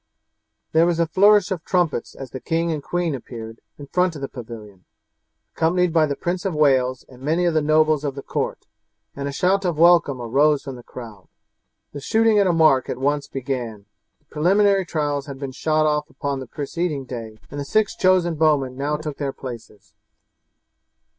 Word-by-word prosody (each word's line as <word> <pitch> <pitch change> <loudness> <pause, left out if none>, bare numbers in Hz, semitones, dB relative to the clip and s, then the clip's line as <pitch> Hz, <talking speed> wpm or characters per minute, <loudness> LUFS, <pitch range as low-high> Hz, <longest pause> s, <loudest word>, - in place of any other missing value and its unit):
There 165 +2 +4
was 170 -1 0
a 170 - +3
flourish 200 +4 +4
of 175 -4 -3
trumpets 175 -9 -1
as 135 -3 -9
the 130 - -6
king 165 +3 -1
and 155 -2 -3
queen 175 +1 -1
appeared 115 -3 -8 0.2
in 145 - -9
front 180 +3 0
of 140 - -7
the - - -1
pavilion, 110 -7 -10 0.7
accompanied 175 +1 +1
by 160 -2 +4
the 140 - -2
Prince 175 +4 -3
of 190 -5 -2
Wales 130 -4 +2
and 125 -1 -16
many 160 +6 +1
of 170 - +2
the 155 - +2
nobles 155 0 +3
of 140 -2 -3
the 140 - -7
court, - - -3 0.5
and 140 0 -4
a - - -3
shout 190 +7 +1
of 175 -4 -1
welcome 165 -5 +5
arose 140 +5 +2
from 135 - -7
the 120 - -10
crowd. 115 -6 -11 0.7
The 145 - -7
shooting 220 +6 +3
at 200 - +4
a - - +3
mark 155 -6 +4
at - - -3
once 145 +2 0
began. 120 -6 -5 0.3
The 150 - -41
preliminary 195 +5 +2
trials 145 -4 -2
had 140 -1 -7
been 135 -1 -5
shot 155 +3 +1
off 150 0 0
upon 140 -1 -3
the 130 - -7
preceding 150 +1 -3
day, 115 -4 -7
and 145 - -6
the - - -2
six 210 +9 +1
chosen 185 -2 +3
bowmen 150 -5 +1
now 145 +3 -1
took 150 -2 -6
their 140 -2 -2
places. 115 -5 -10
150 Hz, 195 wpm, -22 LUFS, 135-170 Hz, 0.7 s, welcome